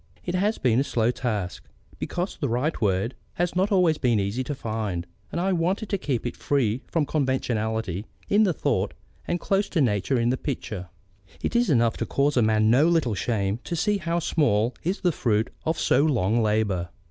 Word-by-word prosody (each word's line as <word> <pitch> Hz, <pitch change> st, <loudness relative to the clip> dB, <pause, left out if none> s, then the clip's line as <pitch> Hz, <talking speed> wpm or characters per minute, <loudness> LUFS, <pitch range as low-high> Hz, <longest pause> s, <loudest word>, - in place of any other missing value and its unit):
It 175 Hz, -, -2 dB
has 205 Hz, +4 st, +1 dB
been 120 Hz, -1 st, +2 dB
a -, -, +3 dB
slow 120 Hz, -4 st, +1 dB
task, 105 Hz, -8 st, -3 dB, 0.4 s
because 180 Hz, +2 st, -3 dB
the 140 Hz, -, -2 dB
right 130 Hz, +8 st, -1 dB
word 100 Hz, +3 st, +1 dB, 0.2 s
has 175 Hz, 0 st, -1 dB
not 190 Hz, +4 st, +1 dB
always 180 Hz, -5 st, +3 dB
been 120 Hz, -4 st, +2 dB
easy 100 Hz, +6 st, -1 dB
to 145 Hz, -, -3 dB
find, 110 Hz, -8 st, -3 dB, 0.3 s
and -, -, -2 dB
I 190 Hz, +2 st, +1 dB
wanted 185 Hz, +5 st, 0 dB
to 200 Hz, -, +1 dB
keep 125 Hz, -7 st, -2 dB
free 130 Hz, -4 st, 0 dB
from 160 Hz, -3 st, 0 dB
conventionality 110 Hz, -, -1 dB, 0.2 s
in 205 Hz, -, +4 dB
the 200 Hz, -4 st, +4 dB
thought 160 Hz, -, -1 dB, 0.3 s
and 175 Hz, -, 0 dB
close 195 Hz, +3 st, 0 dB
to 170 Hz, -, 0 dB
nature 120 Hz, 0 st, +2 dB
in 120 Hz, 0 st, +2 dB
the 130 Hz, -, +1 dB
picture. 110 Hz, -, -5 dB, 0.5 s
It -, -, -1 dB
is 240 Hz, -2 st, +3 dB
enough 115 Hz, -5 st, +3 dB
to -, -, -3 dB
cause 140 Hz, +1 st, +1 dB
a 125 Hz, -, +4 dB
man 110 Hz, 0 st, +3 dB
no 140 Hz, +7 st, +5 dB
little 160 Hz, -9 st, +2 dB
shame 100 Hz, 0 st, -1 dB
to 170 Hz, -, -3 dB
see 205 Hz, +4 st, +1 dB
how 170 Hz, -1 st, -1 dB
small 125 Hz, -9 st, +1 dB
is 185 Hz, +5 st, -2 dB
the 180 Hz, -, +3 dB
fruit 110 Hz, -5 st, 0 dB, 0.2 s
of 160 Hz, -, +1 dB
so -, -, +3 dB
long 120 Hz, -7 st, +2 dB
labour. 105 Hz, -5 st, 0 dB
125 Hz, 195 wpm, -25 LUFS, 110-170 Hz, 0.5 s, no